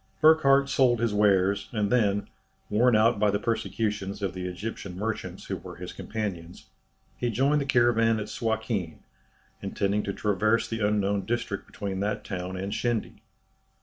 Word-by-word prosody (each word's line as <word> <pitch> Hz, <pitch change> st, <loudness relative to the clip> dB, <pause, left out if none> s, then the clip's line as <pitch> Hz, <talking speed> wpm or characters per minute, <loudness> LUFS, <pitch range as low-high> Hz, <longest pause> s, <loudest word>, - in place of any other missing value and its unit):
Burckhardt 140 Hz, -3 st, +5 dB
sold 125 Hz, -4 st, +3 dB
his 115 Hz, -2 st, 0 dB
wares, 100 Hz, -1 st, +2 dB
and 105 Hz, -3 st, -1 dB
then, 105 Hz, -5 st, +2 dB, 0.4 s
worn 120 Hz, +3 st, +4 dB
out 110 Hz, 0 st, +4 dB
by 105 Hz, 0 st, +3 dB
the 100 Hz, -, +1 dB
persecutions 105 Hz, -2 st, -2 dB
of 95 Hz, -3 st, -1 dB
the 90 Hz, 0 st, -4 dB
Egyptian 90 Hz, 0 st, -6 dB
merchants 110 Hz, +2 st, -4 dB
who -, -, -3 dB
were -, -, -10 dB
his -, -, -8 dB
companions, 95 Hz, -6 st, -5 dB, 0.5 s
he 120 Hz, -, -1 dB
joined 135 Hz, +6 st, +2 dB
the -, -, -2 dB
caravan 115 Hz, -3 st, +3 dB
at 105 Hz, -, -4 dB
Suakin, 110 Hz, -7 st, -2 dB, 0.6 s
intending 100 Hz, +1 st, 0 dB
to 100 Hz, -, -3 dB
traverse 110 Hz, +3 st, +1 dB
the 115 Hz, -, -4 dB
unknown 100 Hz, -1 st, +1 dB
district 120 Hz, +1 st, -2 dB
between 95 Hz, -2 st, -4 dB
that 105 Hz, +2 st, -2 dB
town 90 Hz, -1 st, -5 dB
and 100 Hz, +2 st, -3 dB
Shendy. 120 Hz, -1 st, -2 dB
105 Hz, 155 wpm, -27 LUFS, 100-115 Hz, 0.6 s, Burckhardt